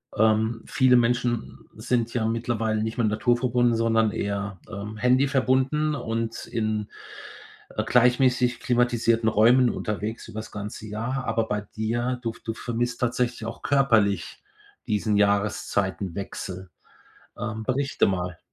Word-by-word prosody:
Ähm, 110 +1 +2
viele 130 -1 +4
Menschen 120 -1 +1 0.2
sind 115 +1 -1
ja 115 -3 0
mittlerweile 115 -1 -1
nicht 110 0 -4
mehr 115 -3 +2
naturverbunden, 120 +2 +2
sondern 115 -1 +2
eher, 100 -1 -3
ähm, 105 +3 -6
handy-verbunden 130 +4 +2
und 115 -3 -3
in, 110 -2 -2 0.9
äh, - - 0
gleichmäßig 125 0 +3
klimatisierten 120 -2 +2
Räumen 120 +4 +5
unterwegs 105 +1 -4
über's 110 +1 -7
ganze 105 +1 -7
Jahr. 120 +5 -3
Aber 115 -2 0
bei 105 -1 -1
dir 120 +4 -2
du 115 -1 -2
v - - -17
du 115 - -3
vermisst 120 +1 -3
tatsächlich 120 -1 -1
auch 115 - -6
körperlich 115 -8 +1 0.4
diesen 105 -1 +1
Jahreszeitenwechsel. 100 -2 -1 0.7
Ähm, 110 0 -4
berichte 135 +3 +1
mal. 90 -3 -2
115 Hz, 125 wpm, -25 LUFS, 105-125 Hz, 0.9 s, Räumen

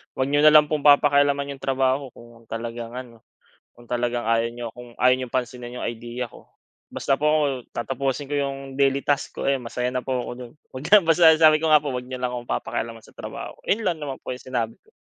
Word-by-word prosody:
Huwag 130 - 0
niyo 145 +1 +2
na 155 - +8
lang 150 -1 +7
pong 150 -1 -2
papakialaman 145 -1 +4
iyong 135 - -20
trabaho 135 0 0
ko - - -16 0.2
kung - - -25
talagang 115 0 -5
ano, 120 -3 -9 0.5
kung 120 0 -17
talagang 120 -1 -1
ayaw 115 0 +2
niyo 120 0 -7
kung 125 -1 -11
ayaw 125 0 +5
niyong 130 -2 -5
pansinin 125 -1 -3
iyong - - -3
idea 120 +2 -5
ko. - - -17 0.4
Basta 135 - 0
po 150 - -3
ako, 155 0 +3 0.3
tatapusin 135 +4 -2
ko - - -1
iyong 140 -1 -2 0.2
daily 140 0 +2
task 145 -1 0
ko, - - -2
ayun 135 -2 +1
masaya 125 +1 -2
na 125 - -1
po 130 -2 -1
ako - - -5
doon." 125 -2 -9 0.2
pagka 160 +11 +5 0.4
sabi 155 -1 +6
ko 160 - +1
nga 155 - +8
"Huwag 125 -4 -4
niyo 130 - -4
lang 125 -1 -1
akong 120 -1 -7
papakialaman 115 -1 -5
sa - - -20
trabaho". - - -7
Iyon 220 +2 0
lang 170 - 0
naman 135 -2 -5
po 130 - -4
yung 125 - -12
sinabi 120 -3 -3
ko. 440 - -28
130 Hz, 225 wpm, -24 LUFS, 120-145 Hz, 0.5 s, na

